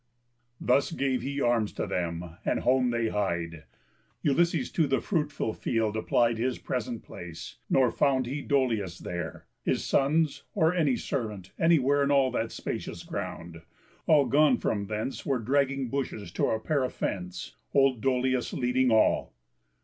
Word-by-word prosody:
Thus 135 +5 +2
gave 135 -5 0
he 140 +1 -3
arms 120 -4 +2
to - - -2
them, 85 -3 -3
and - - 0
home 125 0 +3
they 115 -1 0
hied. 85 -6 -2 0.6
Ulysses 170 +4 +2
to 160 -3 +2
the 135 - +2
fruitful 150 - -1
field 110 -2 -1
applied 115 +1 +2
His 125 +1 0
present 120 -2 -4
place; 85 -2 -9
nor 130 -3 +4
found 135 -3 +2
he 140 +4 -3
Dolius 115 - 0
there, 90 -2 -6 0.2
His - - 0
sons, 150 +2 +2
or 160 -3 +3
any 155 -8 +2
servant, 105 -8 -4
anywhere 145 -4 +4
In 140 - +2
all 135 -2 +4
that 115 -2 -2
spacious - - -5
ground; 85 -1 -6 0.5
all 150 -3 +5
gone 145 -3 +4
from 100 -2 -1
thence 110 +5 -3
Were 135 -2 0
dragging 135 +2 +1
bushes 115 -9 -3
to - - 0
repair 130 +6 0
a 130 - 0
fence, 90 - -4 0.2
Old 135 -4 +3
Dolius 130 -1 +1
leading 125 +1 +2
all. 110 - +3
125 Hz, 150 wpm, -28 LUFS, 105-140 Hz, 0.6 s, all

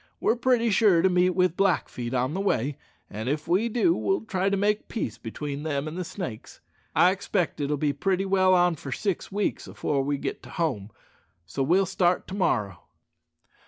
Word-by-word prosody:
We're - - +2
pretty 240 -2 +2
sure 195 -5 +4
to 190 - +4
meet 180 0 +3
with 180 -2 +2
Blackfeet 130 -10 0
on 130 +3 0
the 190 - -2
way, 145 - 0 0.3
and 110 +4 -5
if 150 +2 -2
we 190 +7 +2
do 245 +9 +3
we'll 390 - 0
try 190 -2 0
to 200 - 0
make 210 +2 0
peace 120 - -4
between 140 +5 -5
them 150 -1 -2
an' 155 - -5
the 180 +2 -3
Snakes. 170 - -7 0.4
I 180 +1 +5
'xpect 190 -4 -2
it'll 145 0 -1
be 145 0 0
pretty 190 +6 0
well 190 -1 +4
on 175 -2 +3
for 140 - -8
six 195 +6 -2
weeks 205 +1 -2
afore 140 -2 -1
we 145 +1 -1
git - - -4
to - - -13
home, 130 - -2 0.6
so 115 +10 -4
we'll 180 +8 +3
start 180 -1 +1
to - - -6
morrow." 105 - 0
180 Hz, 195 wpm, -26 LUFS, 140-195 Hz, 0.6 s, I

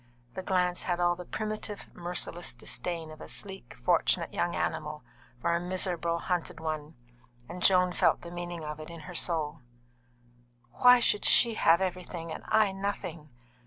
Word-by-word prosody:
The - - -4
glance 180 -1 0
had 175 -1 0
all 175 0 +3
the 180 0 -9
primitive, 215 0 -5
merciless 175 0 -4
disdain 165 -3 -3
of 155 0 -12
a - - -8
sleek, 195 -10 -6
fortunate 170 +4 +1
young 175 - -1
animal 150 -2 -3 0.4
for 170 +6 +1
a - - +1
miserable, 175 -2 0
hunted 170 -2 -2
one, 155 -1 -4 0.5
and 180 +1 -8
Joan 180 -1 +5
felt - - +3
the 170 - -9
meaning 175 -1 -5
of 150 0 -6
it 155 - -8
in 170 -1 -9
her 180 +4 -9
soul. 160 -3 0 1.1
"Why 250 - +7
should 210 -3 +2
she 235 -1 +7
have 170 -4 +4
everything 180 -3 -4
and - - -7
I 215 -2 +4
nothing?" 190 -5 -4
175 Hz, 160 wpm, -29 LUFS, 165-185 Hz, 1.1 s, Why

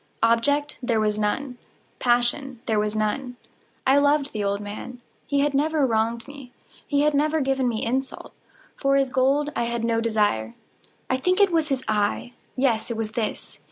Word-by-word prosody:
Object 285 +6 +2
there 240 -3 +1
was 210 0 0
none. 245 +4 -2 0.4
Passion 245 +1 +1
there 220 -3 +1
was 210 0 -1
none. 245 +4 -1 0.5
I 270 +2 +5
loved 285 0 +2
the 210 -2 -2
old 200 0 0
man. 210 +4 -7 0.3
He 280 -1 +1
had 290 0 +1
never 300 +1 +2
wronged 230 0 0
me. 275 -3 -11 0.4
He 285 -1 +2
had 300 0 +3
never 305 +2 +2
given 265 -2 +1
me 220 -2 -2
insult. 260 +3 -3 0.4
For 275 0 +2
his 275 -1 +2
gold 275 +3 +2
I 235 - 0
had 235 -1 -2
no 230 -1 +1
desire. 205 - 0 0.5
I 260 - +1
think 365 +8 +1
it 400 -2 +5
was 325 -2 +2
his 265 -2 -1
eye! 215 +3 0 0.2
yes, 250 -4 +1
it 235 - -3
was 220 -1 -3
this! 225 -1 -4
250 Hz, 180 wpm, -24 LUFS, 225-280 Hz, 0.5 s, I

